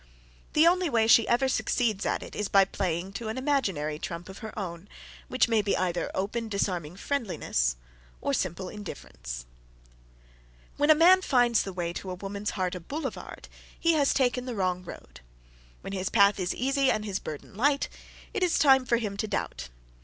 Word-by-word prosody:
The 310 +1 +5
only 355 0 +4
way 225 -4 +3
she 230 0 +6
ever 245 +3 +3
succeeds 230 -5 0
at - - -1
it - - -10
is 210 - -1
by 195 -1 +6
playing 185 -1 -3
to 220 +3 -5
an 220 - -3
imaginary 195 - 0
trump 170 +3 -6
of 190 - -9
her 220 -1 -8
own, 185 -1 -6 0.4
which 255 - +2
may 225 -2 +3
be 200 -1 0
either 180 -1 -1
open, 220 +4 -2
disarming 180 -5 -2
friendliness, 185 - -1 0.4
or 140 - -1
simple 185 +4 -2
indifference. - - -8 1.3
When 290 +1 +1
a 310 - +9
man 360 +4 +6
finds 245 - +3
the 195 - -4
way 175 -2 -3
to 190 - -6
a 180 - -4
woman's 200 +2 -4
heart 185 -1 0
a 180 - -4
boulevard, 290 - -6 0.3
he 335 0 +3
has 290 -3 +3
taken 250 -2 +1
the 250 -2 -4
wrong 185 -2 -1
road. 60 - -11 0.6
When 195 - -7
his 185 -1 -2
path 200 -2 +4
is 180 -1 -1
easy 275 +1 +1
and 215 -3 0
his 200 -3 -2
burden 150 -2 -8
light, 280 +6 +2 0.5
it - - -2
is 360 -2 +2
time 265 -3 +5
for 235 - +3
him 210 -4 -4
to 215 - -2
doubt. - - -3
205 Hz, 185 wpm, -28 LUFS, 180-255 Hz, 1.3 s, a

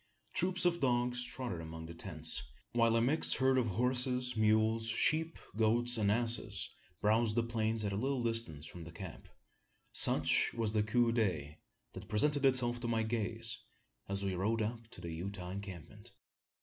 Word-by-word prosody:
Troops 185 0 +2
of 170 -1 +2
dogs 125 -2 +1
trotted 125 -9 -5
among 80 0 -8
the 85 - -9
tents; 80 -2 0 0.3
while 115 -1 +3
a 115 - +3
mixed 145 +6 +2
herd 130 0 +3
of 120 - 0
horses, 125 +3 0
mules, 110 +1 +2
sheep, 160 +8 0 0.2
goats, 120 +3 +2
and 105 -3 +1
asses 115 -3 0 0.3
browsed 110 +1 +2
the 120 - +2
plain 115 -1 -1
at 100 - -2
a - - -2
little 130 +3 -1
distance 115 -11 0
from 85 +1 -9
the 80 - -10
camp. 85 -1 -9 0.7
Such 80 +2 +5
was 110 -2 0
the 110 - +2
coup 115 +2 +2
d'oeil 90 -11 -1 0.4
that - - -9
presented 145 +6 +2
itself 120 -2 +3
to 120 - -4
my 115 -1 0
gaze, 115 0 -1 0.5
as 100 0 -2
we 95 - -1
rode 110 +5 0
up 115 +1 -5
to - - -13
the 85 -1 -6
Utah 90 +1 -6
encampment. 95 -4 -8
115 Hz, 170 wpm, -34 LUFS, 100-120 Hz, 0.7 s, Such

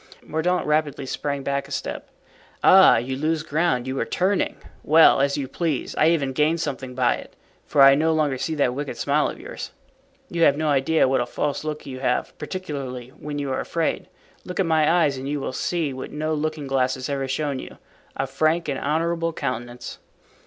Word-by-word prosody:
Mordaunt 175 +4 0
rapidly 150 -2 0
sprang 140 +1 -3
back 140 0 -2
a - - -15
step. - - -4 0.5
"Ah! - - +8
you 125 +3 -2
lose 155 +3 -1
ground, 155 -5 0
you 130 +1 -3
are - - +1
turning? 190 +2 0 0.3
Well, 155 -2 +6
as 140 +1 +1
you 140 -2 -3
please, 150 0 -2
I 155 - +4
even 140 -6 +1
gain 155 +4 +2
something 135 -5 -4
by 125 -1 +2
it, - - -12 0.3
for 140 - +5
I 135 0 +9
no 155 +3 +2
longer 150 -5 +1
see 160 - -2
that 140 -4 +1
wicked 145 +1 -5
smile 150 +1 +1
of - - -8
yours. - - -7 0.6
You 170 -8 -3
have 145 -3 +5
no 155 0 0
idea 145 +2 +3
what 130 -1 +2
a 120 - -2
false 145 0 -2
look 155 -1 -5
you 130 -2 -7
have, 125 -1 -1
particularly 140 -8 -5
when 145 +2 -7
you 140 -2 -2
are 130 - -1
afraid. 165 -1 -2 0.4
Look 180 - -6
at 190 - +3
my 160 -2 +3
eyes 160 -6 +2
and 135 +1 -5
you 145 0 -1
will 135 - -4
see 160 -1 -1
what 130 - -6
no 155 +1 -2
looking 155 -1 -2
glass 130 -1 +1
has 130 -1 -5
ever 135 -1 -2
shown 140 0 -2
you—a 135 - -8
frank 155 +5 0
and 140 -2 -2
honorable 165 +3 0
countenance." 120 -3 -5
145 Hz, 200 wpm, -23 LUFS, 135-160 Hz, 0.6 s, I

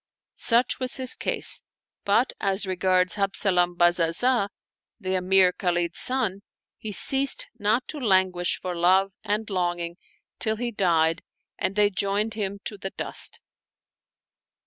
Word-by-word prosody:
Such 235 +1 +2
was 255 0 -1
his 255 -1 +4
case; - - 0 0.4
but 225 +6 +1
as 195 +1 -1
regards 185 0 +1
Habzalam 185 -3 -1
Bazazah, 175 +7 +1 0.5
the 190 -3 -4
Emir 185 0 +3
Khalid's 175 -2 -2
son, 230 -7 +3 0.4
he 215 - -7
ceased 270 +6 +6
not 215 +5 0
to 300 - -6
languish 185 -6 0
for 180 -1 -5
love 185 +3 +2
and 210 +1 -2
longing 175 -3 -3 0.4
till 220 -1 -1
he 240 +2 -4
died 165 -5 0 0.4
and 195 - -2
they 210 0 +2
joined 200 +3 -2
him 200 -2 -4
to 205 - -6
the 195 - -5
dust. - - -2
195 Hz, 130 wpm, -24 LUFS, 180-215 Hz, 0.5 s, ceased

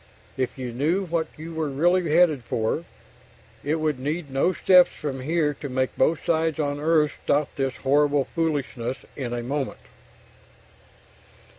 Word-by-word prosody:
If 130 0 -2
you 125 -2 -4
knew 160 +11 0
what 165 -2 -1
you 165 +2 -8
were 160 -2 -2
really 175 +5 +2
headed 160 -6 +4
for, 115 +8 -1 0.8
it 150 +3 0
would 155 -4 -1
need 150 +2 -3
no 135 +7 +2
steps 180 -1 +5
from 140 -4 -5
here 150 +2 0
to 145 0 -7
make 130 0 -1
both 155 +4 +1
sides 160 -2 +1
on 145 -2 -1
Earth 155 -1 +3
stop 145 0 +1
this 135 -2 -2
horrible 145 0 +2
foolishness 140 -6 -2 0.2
in 130 -4 -4
a 120 0 -3
moment. 135 +2 -3
150 Hz, 150 wpm, -25 LUFS, 135-160 Hz, 0.8 s, steps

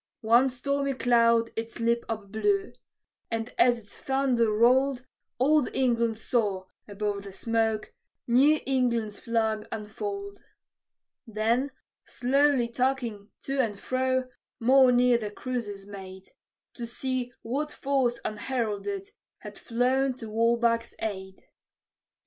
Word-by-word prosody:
One 235 +4 +4
stormy 275 +2 -1
cloud 230 -2 +3
its 230 +1 -5
lip 235 0 +1
upblew; 225 - -1 0.6
and 225 +1 -3
as 245 -1 +5
its 210 -3 -14
thunder 260 -4 +1
rolled, 255 +4 +3 0.3
Old 290 +2 +3
England 235 -3 +1
saw, 210 -5 -1 0.2
above 205 0 -3
the 200 0 -9
smoke, 220 +1 -1 0.3
New 275 +6 +4
England's 235 -5 0
flag 220 -2 -1
unfold. 400 - -5 0.9
Then, 230 +5 0 0.3
slowly 275 0 +2
tacking 235 -4 -2
to 275 0 -2
and 215 -6 0
fro, 260 +1 0 0.3
more 260 +2 +6
near 245 -1 +4
the 210 -2 -4
cruisers 205 -4 -5
made, 190 -2 -10 0.4
To 235 -2 -6
see 255 +1 -3
what 285 +6 -2
force 265 -3 0
unheralded 250 - -3 0.3
had - - -9
flown 255 +2 +1
to 225 -3 -8
Walbach's 230 +1 +1
aid. 190 -3 -5
235 Hz, 115 wpm, -27 LUFS, 220-260 Hz, 0.9 s, more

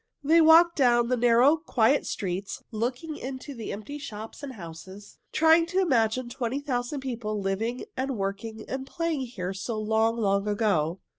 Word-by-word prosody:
They 325 +4 +5
walked 330 +2 +6
down 240 -3 +3
the 255 - +2
narrow, 245 +5 +4
quiet 275 -4 +2
streets, 190 0 -4
looking 250 +8 -3
into 260 +2 -7
the 230 -4 -6
empty 250 +9 -7
shops 220 -3 -8
and 280 -2 -6
houses, 190 +1 -11
trying 325 +1 +4
to 370 +2 0
imagine 255 -7 +1
twenty 240 +2 -3
thousand 265 -1 -3
people 230 -5 -3
living 215 - -2
and 265 -1 -2
working 205 +3 -4
and 265 0 -5
playing 330 -3 -2
here 190 -6 -5
so 215 +3 -4
long, 220 +2 +1
long 200 -2 +1
ago. 195 -5 0
240 Hz, 160 wpm, -27 LUFS, 210-275 Hz, -, walked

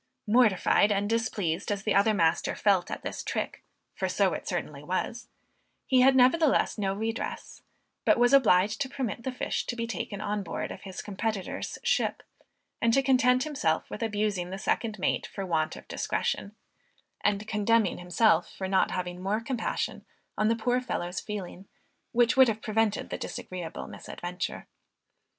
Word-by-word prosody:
Mortified 215 -2 +4
and 200 0 +1
displeased 205 -6 -1
as 200 -1 -2
the 215 - +1
other 205 +2 +4
master 165 -2 +2
felt 195 -4 +2
at - - -5
this - - -4
trick, - - -3 0.3
for - - -2
so - - +2
it - - -5
certainly - - -3
was, - - -3 0.6
he 255 -1 +4
had 265 +1 +6
nevertheless 265 +4 +4
no 195 -2 -1
redress, 225 +3 -4 0.4
but - - +4
was 245 +2 +4
obliged 210 -4 +4
to 270 - -1
permit 255 -5 -3
the 260 - -3
fish 250 - -2
to 240 - -2
be 230 -1 -2
taken 205 -2 -4
on 210 0 -2
board 185 - -4
of - - -8
his 190 -2 -7
competitor's 205 -1 -3
ship, - - +1 0.6
and 230 0 +3
to 275 - +3
content 255 -1 +4
himself 275 - 0
with - - -6
abusing 210 -5 -1
the 190 - -5
second 215 +2 -1
mate 185 - 0
for 195 - -5
want 160 -3 0
of - - -12
discretion, 205 +1 -2 0.7
and 205 +1 +1
condemning 215 -1 +2
himself 180 0 +3
for 190 - -5
not 190 0 +3
having 180 -1 -4
more 200 +3 0
compassion 230 0 -3 0.3
on 215 - +1
the 230 - +3
poor 245 +2 +1
fellow's 180 -7 -3
feeling, 195 -2 -7 0.4
which 240 0 +3
would 260 -1 +7
have 220 -1 -2
prevented 215 -1 0
the - - -3
disagreeable 175 -3 -6
misadventure. 180 +1 -6
210 Hz, 165 wpm, -28 LUFS, 190-235 Hz, 0.7 s, would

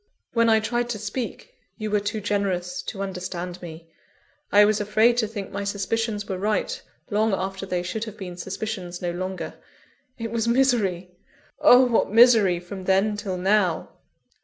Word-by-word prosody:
_ - - -47 0.3
When 230 -1 +3
I 220 0 +5
tried 240 +2 -1
to 235 - -2
speak, 230 - -5 0.2
you 215 -2 -4
were 210 - +3
too 205 +1 -3
generous 185 -3 -1
to 195 -2 -4
understand 180 -1 -5
me 165 -1 -9 0.6
I 205 0 +7
was 215 0 +2
afraid 215 +3 +3
to 225 -3 +2
think 205 -2 -6
my 200 +1 -3
suspicions 205 +1 -2
were 190 -1 -3
right, 215 - -1 0.3
long 215 0 +2
after 190 +1 -4
they 180 -1 -1
should 215 +5 -3
have 220 -2 -9
been 180 -2 -7
suspicions 185 -1 -5
no 175 - 0
longer. 185 +2 -4 0.6
It 230 -1 -5
was 230 -1 -1
misery! 225 -8 +1 0.5
oh, 260 -4 +7
what 240 -2 +2
misery 225 -6 +6
from 185 +2 -8
then 195 +3 +2
till 195 -3 -4
now!" 185 -2 +1
205 Hz, 170 wpm, -24 LUFS, 185-225 Hz, 0.6 s, I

